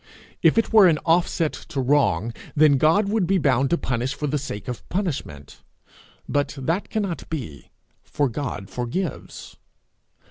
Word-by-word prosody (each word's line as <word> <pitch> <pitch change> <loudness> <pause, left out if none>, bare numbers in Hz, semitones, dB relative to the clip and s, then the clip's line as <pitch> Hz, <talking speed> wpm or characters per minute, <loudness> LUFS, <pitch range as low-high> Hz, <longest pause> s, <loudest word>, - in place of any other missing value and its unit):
If - - +4
it 225 - +1
were 210 -4 +8
an 160 -3 +3
offset 165 -1 +2
to 160 -5 -6
wrong, 125 - +2 0.2
then 145 -2 +5
God 165 +8 +3
would 205 -4 +1
be 195 +1 +3
bound 135 -4 +2
to 170 - +2
punish 125 0 -2
for 150 - -4
the 145 0 -1
sake 130 -7 -7
of 125 -2 -3
the - - -25
punishment; 140 - -4 0.7
but 145 0 0
he 140 - -9 0.3
cannot 200 -6 -3
be, 120 - -6 0.3
for 145 -2 -1
he 120 -5 -4
forgives. 125 - -5
145 Hz, 155 wpm, -23 LUFS, 125-170 Hz, 0.7 s, were